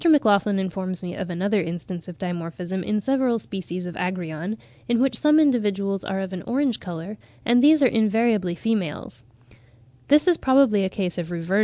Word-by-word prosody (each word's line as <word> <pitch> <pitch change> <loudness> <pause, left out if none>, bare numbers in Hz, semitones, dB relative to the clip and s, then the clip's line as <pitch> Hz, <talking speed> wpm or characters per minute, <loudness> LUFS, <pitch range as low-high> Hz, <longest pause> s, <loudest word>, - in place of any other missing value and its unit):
MacLachlan 210 -9 +4
informs 185 -1 -3
me 175 -1 -5
of 190 -2 -5
another 195 +4 0
instance 170 +1 -6
of 180 -2 -9
dimorphism 175 +1 -4
in 210 +3 -1
several 265 -1 +1
species 185 -4 -6
of 175 - -6
Agrion, 180 +2 -4 0.3
in 240 -1 +2
which 265 +1 +1
some 300 0 +5
individuals 205 -9 +1
are 195 0 -3
of 190 0 -5
an 180 - -5
orange 260 -1 0
colour, 180 +3 -7 0.3
and 240 +1 +4
these 305 0 +6
are - - +7
invariably 220 -5 +1
females. 175 - -3
195 Hz, 140 wpm, -23 LUFS, 180-230 Hz, 0.3 s, are